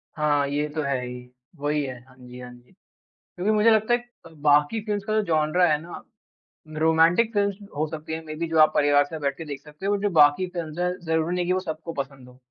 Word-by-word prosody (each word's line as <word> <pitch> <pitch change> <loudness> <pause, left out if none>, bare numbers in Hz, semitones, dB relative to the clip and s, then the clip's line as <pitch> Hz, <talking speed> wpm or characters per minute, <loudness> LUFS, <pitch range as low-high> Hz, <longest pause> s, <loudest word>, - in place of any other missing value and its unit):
हाँ, 145 -2 +1
ये 145 +1 -1
तो 155 - 0
है 140 -2 -1
ही, 125 0 -9 0.3
वही 145 0 0
है 130 -2 -7
हाँ 130 - -20
जी, 125 0 -12
हाँ 125 0 -9
जी। 120 +5 -19 0.5
क्योंकि 195 +5 -3
मुझे 215 +2 +4
लगता 220 +2 +3
है - - +2 0.3
क 165 - -14
बाकी 150 +8 +3
फिल्म्स 205 -2 -2
का 215 - -3
जो 215 - +2
जॉनरा 160 +2 +2
है 150 -1 +1
ना, 170 - -9 0.8
रोमांटिक 165 +8 +3
फिल्म्स 200 -1 +1 0.2
हो 155 +1 0
सकती 160 0 -7
हैं, 160 - -6
मेबी 160 +2 -4
जो 160 -1 0
आप 155 - +6
परिवार 145 0 +4
से 150 - -10
साथ - - -8
बैठ 140 -1 -1
के 165 - -6
देख 145 -2 -7
सकते 150 +6 -9
हो 205 - +2
और 205 - +1
जो 205 - +1
बाकी 145 +6 +5
फिल्म्स 170 -3 -6
है, 180 0 0
ज़रूरी 160 +2 0
नहीं 180 -1 0
है - - -5
कि 180 - +1
वो 185 - +1
सबको 165 -1 -6
पसंद 135 -2 -16
हों। 125 - -17
155 Hz, 250 wpm, -24 LUFS, 145-180 Hz, 0.8 s, आप